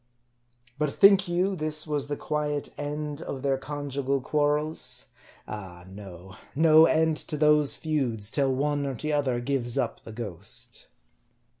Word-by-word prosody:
But 150 Hz, -1 st, +1 dB
think 195 Hz, +1 st, +6 dB
you 180 Hz, +3 st, 0 dB
this 155 Hz, -2 st, +1 dB
was 145 Hz, -2 st, -1 dB
the 145 Hz, 0 st, -3 dB
quiet 150 Hz, -1 st, -2 dB
end 150 Hz, +1 st, -4 dB
of 135 Hz, -4 st, -6 dB
their 135 Hz, -1 st, +1 dB
conjugal 140 Hz, -1 st, -2 dB
quarrels? 150 Hz, +3 st, -1 dB, 0.4 s
Ah, 95 Hz, -4 st, -8 dB
no! 95 Hz, -1 st, -11 dB, 0.2 s
No 160 Hz, +1 st, +7 dB
end 160 Hz, -1 st, +2 dB
to 150 Hz, -, -5 dB
those 150 Hz, -1 st, +4 dB
feuds, 125 Hz, -10 st, -2 dB
till 140 Hz, -2 st, +2 dB
one 145 Hz, +2 st, 0 dB
or 135 Hz, -, -3 dB
t'other 145 Hz, -3 st, 0 dB
gives 120 Hz, -2 st, -1 dB
up 115 Hz, -, -1 dB
the -, -, -10 dB
ghost. 105 Hz, -5 st, -4 dB
145 Hz, 140 wpm, -27 LUFS, 125-150 Hz, 0.4 s, No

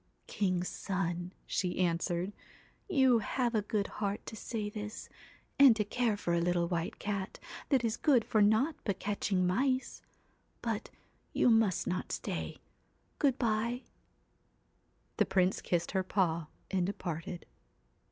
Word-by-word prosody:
'King's 185 Hz, -3 st, 0 dB
son,' 175 Hz, -2 st, -2 dB
she 180 Hz, -2 st, -1 dB
answered, 175 Hz, +2 st, 0 dB, 0.6 s
'you 265 Hz, -9 st, +5 dB
have 240 Hz, +3 st, -1 dB
a 215 Hz, -, +2 dB
good 205 Hz, 0 st, -1 dB
heart 205 Hz, -1 st, -3 dB
to -, -, -7 dB
say 215 Hz, -1 st, -3 dB
this, 210 Hz, +1 st, -6 dB, 0.5 s
and 270 Hz, -5 st, +9 dB
to 215 Hz, -, +1 dB
care 230 Hz, 0 st, 0 dB
for 175 Hz, -4 st, -1 dB
a 170 Hz, -, +2 dB
little 175 Hz, 0 st, +1 dB
white 170 Hz, +1 st, -2 dB
cat, 200 Hz, -2 st, -3 dB, 0.3 s
that 265 Hz, -4 st, +3 dB
is 225 Hz, 0 st, 0 dB
good 260 Hz, -7 st, +4 dB
for 215 Hz, -, +2 dB
naught 220 Hz, +9 st, +4 dB
but 200 Hz, -3 st, -1 dB
catching 195 Hz, -2 st, 0 dB
mice; 255 Hz, +8 st, 0 dB, 0.6 s
but -, -, -2 dB, 0.4 s
you 245 Hz, -, +4 dB
must 225 Hz, -4 st, +3 dB
not 180 Hz, 0 st, -2 dB
stay. -, -, -3 dB, 0.6 s
Good 275 Hz, -3 st, +3 dB
bye.' 235 Hz, +2 st, 0 dB, 1.3 s
The -, -, +4 dB
Prince 185 Hz, 0 st, +2 dB
kissed 175 Hz, -1 st, 0 dB
her 190 Hz, -, +1 dB
paw 170 Hz, -4 st, 0 dB, 0.2 s
and 185 Hz, -2 st, +1 dB
departed. 175 Hz, -3 st, -4 dB
205 Hz, 140 wpm, -32 LUFS, 180-225 Hz, 1.3 s, and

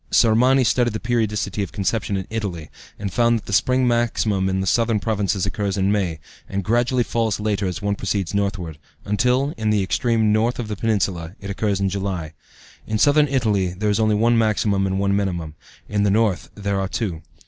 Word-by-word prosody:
Sormani 125 Hz, +4 st, +4 dB
studied 120 Hz, -1 st, +2 dB
the 110 Hz, -, -3 dB
periodicity 110 Hz, -3 st, -1 dB
of 100 Hz, -, -3 dB
conception 100 Hz, 0 st, -1 dB
in 95 Hz, -, -4 dB
Italy, 95 Hz, -8 st, -4 dB, 0.3 s
and 100 Hz, -3 st, -5 dB
found 120 Hz, -1 st, +3 dB
that 110 Hz, -, -9 dB
the -, -, -5 dB
spring 125 Hz, +5 st, +3 dB
maximum 110 Hz, -5 st, +1 dB
in 95 Hz, 0 st, 0 dB
the 95 Hz, -, -1 dB
southern 115 Hz, +2 st, +2 dB
provinces 100 Hz, -3 st, -1 dB
occurs 100 Hz, -1 st, -2 dB
in 95 Hz, +1 st, +2 dB
May, 90 Hz, -6 st, -1 dB, 0.3 s
and 100 Hz, 0 st, -2 dB
gradually 120 Hz, +4 st, +2 dB
falls 110 Hz, -1 st, -1 dB
later 105 Hz, -2 st, -1 dB
as 90 Hz, +3 st, -4 dB
one 100 Hz, 0 st, +1 dB
proceeds 100 Hz, -2 st, -2 dB
northward, 100 Hz, -6 st, -2 dB, 0.3 s
until, 125 Hz, +8 st, +1 dB
in 110 Hz, -1 st, -1 dB
the 105 Hz, -2 st, +2 dB
extreme 110 Hz, +1 st, +1 dB
north 115 Hz, +3 st, +1 dB
of 115 Hz, -3 st, -4 dB
the 105 Hz, -, -2 dB
peninsula, 95 Hz, -5 st, -1 dB
it 100 Hz, 0 st, -6 dB
occurs 100 Hz, -1 st, -1 dB
in 100 Hz, -, +1 dB
July. 95 Hz, -5 st, -3 dB, 0.5 s
In 110 Hz, -, -1 dB
southern 145 Hz, +5 st, +4 dB
Italy 105 Hz, -9 st, 0 dB
there 105 Hz, +2 st, 0 dB
is 105 Hz, -, 0 dB
only 110 Hz, -1 st, +3 dB
one 115 Hz, +2 st, +3 dB
maximum 105 Hz, -3 st, +1 dB
and 95 Hz, 0 st, -1 dB
one 100 Hz, 0 st, +1 dB
minimum; 90 Hz, -6 st, -2 dB, 0.3 s
in 105 Hz, -1 st, -1 dB
the 100 Hz, -, +3 dB
north 105 Hz, -2 st, +1 dB
there 100 Hz, -1 st, -2 dB
are 95 Hz, -, -1 dB
two. 95 Hz, -6 st, -3 dB
105 Hz, 200 wpm, -22 LUFS, 95-115 Hz, 0.5 s, Sormani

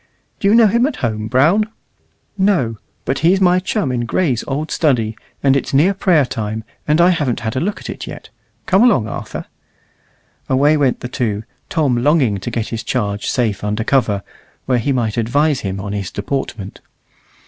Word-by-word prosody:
"Do 195 Hz, -, +1 dB
you 205 Hz, -, +5 dB
know 230 Hz, -1 st, +7 dB
him 235 Hz, +5 st, +3 dB
at 305 Hz, -, -4 dB
home, 110 Hz, -1 st, -2 dB
Brown?" 165 Hz, -, +3 dB, 0.7 s
"No; 185 Hz, -, +1 dB, 0.3 s
but 135 Hz, -, -1 dB
he's 180 Hz, +4 st, +3 dB
my 180 Hz, -1 st, +4 dB
chum 185 Hz, -, -1 dB
in 120 Hz, -1 st, -1 dB
Gray's 125 Hz, -1 st, 0 dB
old 150 Hz, +3 st, -3 dB
study, 115 Hz, -8 st, +1 dB, 0.3 s
and 135 Hz, -1 st, +4 dB
it's 135 Hz, -, -1 dB
near 170 Hz, +8 st, +4 dB
prayer 180 Hz, -7 st, +3 dB
time, 110 Hz, -3 st, -4 dB, 0.2 s
and 150 Hz, +2 st, +3 dB
I 175 Hz, +2 st, +6 dB
haven't 145 Hz, -9 st, -1 dB
had 110 Hz, -1 st, -3 dB
a -, -, +1 dB
look 200 Hz, +7 st, -2 dB
at -, -, -9 dB
it -, -, -6 dB
yet. -, -, -9 dB, 0.4 s
Come 190 Hz, +3 st, +3 dB
along, 210 Hz, -, +4 dB
Arthur." -, -, -6 dB, 1.0 s
Away 140 Hz, +3 st, +4 dB
went 140 Hz, -4 st, +1 dB
the -, -, -4 dB
two, 110 Hz, -5 st, -2 dB, 0.3 s
Tom 145 Hz, -7 st, +1 dB
longing 125 Hz, -6 st, +2 dB
to -, -, -5 dB
get 115 Hz, -2 st, -3 dB
his 115 Hz, -1 st, -3 dB
charge 105 Hz, -3 st, -2 dB
safe 110 Hz, -6 st, 0 dB
under 105 Hz, +1 st, -1 dB
cover, 115 Hz, -6 st, +1 dB, 0.4 s
where 125 Hz, -1 st, +2 dB
he 130 Hz, +5 st, 0 dB
might 120 Hz, -4 st, -1 dB
advise 140 Hz, +5 st, +2 dB
him 95 Hz, -2 st, -4 dB
on 100 Hz, +1 st, -5 dB
his 100 Hz, -3 st, -3 dB
deportment. 105 Hz, -3 st, -4 dB
130 Hz, 185 wpm, -18 LUFS, 110-165 Hz, 1.0 s, know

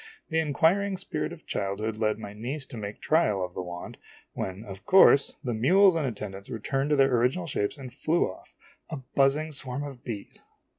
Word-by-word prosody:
The 160 Hz, -, +1 dB
inquiring 170 Hz, +6 st, +2 dB
spirit 195 Hz, -, -3 dB
of 160 Hz, -, -11 dB
childhood 105 Hz, +3 st, -2 dB
led 110 Hz, -1 st, +1 dB
my 105 Hz, -2 st, -8 dB
niece 130 Hz, +7 st, -4 dB
to -, -, -10 dB
make 105 Hz, -2 st, -6 dB
trial 105 Hz, -, +2 dB
of 90 Hz, -, -11 dB
the -, -, -4 dB
wand, 90 Hz, -1 st, -8 dB, 0.3 s
when, 95 Hz, +2 st, -4 dB
of 100 Hz, -1 st, -9 dB
course, 165 Hz, -7 st, +6 dB
the 125 Hz, -3 st, -2 dB
mules 185 Hz, -, +5 dB
and 155 Hz, -4 st, 0 dB
attendants 100 Hz, -4 st, -6 dB
returned 135 Hz, +5 st, -2 dB
to 150 Hz, -, +4 dB
their 135 Hz, -2 st, +4 dB
original 125 Hz, +10 st, +1 dB
shapes 105 Hz, -10 st, -2 dB
and 130 Hz, -3 st, -9 dB
flew 155 Hz, +5 st, +1 dB
off, 95 Hz, -, -12 dB, 0.3 s
a 155 Hz, -, -4 dB, 0.2 s
buzzing 145 Hz, +3 st, +3 dB
swarm 135 Hz, -1 st, -3 dB
of 135 Hz, -4 st, -8 dB
bees 110 Hz, -5 st, -7 dB
130 Hz, 190 wpm, -27 LUFS, 105-155 Hz, 0.3 s, course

